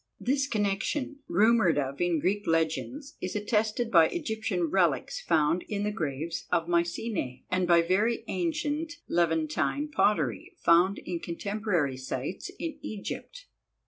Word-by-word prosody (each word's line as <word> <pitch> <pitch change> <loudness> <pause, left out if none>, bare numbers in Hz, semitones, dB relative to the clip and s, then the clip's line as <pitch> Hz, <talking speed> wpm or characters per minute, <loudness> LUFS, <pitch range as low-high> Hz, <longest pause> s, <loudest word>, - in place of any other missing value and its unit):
This 270 +2 +1
connection, 220 +6 -1
rumoured 215 -7 +4
of 140 +1 -2
in 175 -1 +2
Greek 200 +7 0
legends, 165 - -1
is 185 - -4
attested 215 +2 0
by 165 -3 +7
Egyptian 220 - -2
relics 165 -5 +1
found 165 +1 +2
in 205 -1 -2
the 210 - 0
graves 160 -3 -3
of 170 -2 +1
Mycenae, 170 - -1
and 185 -1 +1
by 170 -1 +5
very 205 +7 +1
ancient 315 -1 -1
Levantine 165 - 0
pottery, 155 - +1
found 175 +4 +4
in 175 -2 -4
contemporary 175 -6 -1
sites 130 - -4
in 330 -2 -5
Egypt. - - -6
185 Hz, 130 wpm, -28 LUFS, 165-225 Hz, -, by